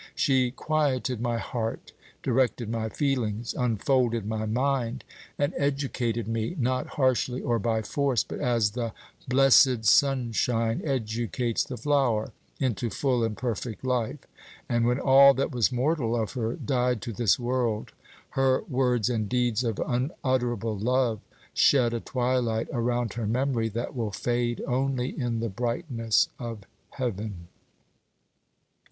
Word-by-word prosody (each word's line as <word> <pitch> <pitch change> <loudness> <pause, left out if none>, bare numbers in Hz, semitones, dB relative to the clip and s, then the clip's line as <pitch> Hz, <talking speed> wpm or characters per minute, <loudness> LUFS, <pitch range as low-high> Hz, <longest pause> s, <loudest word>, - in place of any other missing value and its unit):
She 130 -2 +2
quieted 135 -3 -1
my 120 -1 0
heart, 115 -2 -4 0.3
directed 125 -3 +1
my 110 -1 -2
feelings, 120 -5 -1
unfolded 120 -1 +1
my 110 0 -2
mind, 130 +1 -1 0.3
and 145 +4 0
educated 130 -5 -1
me, 115 +7 -2
not 130 -1 0
harshly 130 -2 +1
or 120 -1 0
by 110 +1 0
force, 135 -2 +1
but - - -7
as 115 -4 +1
the 115 0 -3 0.3
blessed 130 -2 +5
sunshine 115 -2 +2
educates 120 -3 -1
the 125 - -7
flower, 125 -4 +1 0.3
into 120 -4 -1
full 125 +2 0
and 110 -2 -2
perfect 120 0 -4
life; 125 -3 0 0.5
and 120 0 +1
when 125 +2 +1
all 140 +1 +7
that 135 +3 -1
was 120 -2 +2
mortal 125 -2 0
of 110 - -2
her 115 -3 -2
died 125 -3 0
to 115 - -4
this 110 -2 +2
world, 120 -3 -1 0.4
her 135 -1 +2
words 125 -4 +1
and 110 -4 -1
deeds 125 -2 +1
of 115 -4 -1
unutterable 125 - -1
love 120 0 +1 0.3
shed 125 -4 +4
a 115 - -1
twilight 120 -3 0
around 120 -2 0
her 115 -2 -3
memory 120 -1 0
that 115 +5 -4
will 115 -4 -1
fade 120 +3 -1
only 130 0 0
in 120 -5 -2
the 115 - -1
brightness 115 - 0
of 115 -3 -6 0.3
heaven. 105 -8 -4
120 Hz, 135 wpm, -27 LUFS, 115-130 Hz, 0.5 s, all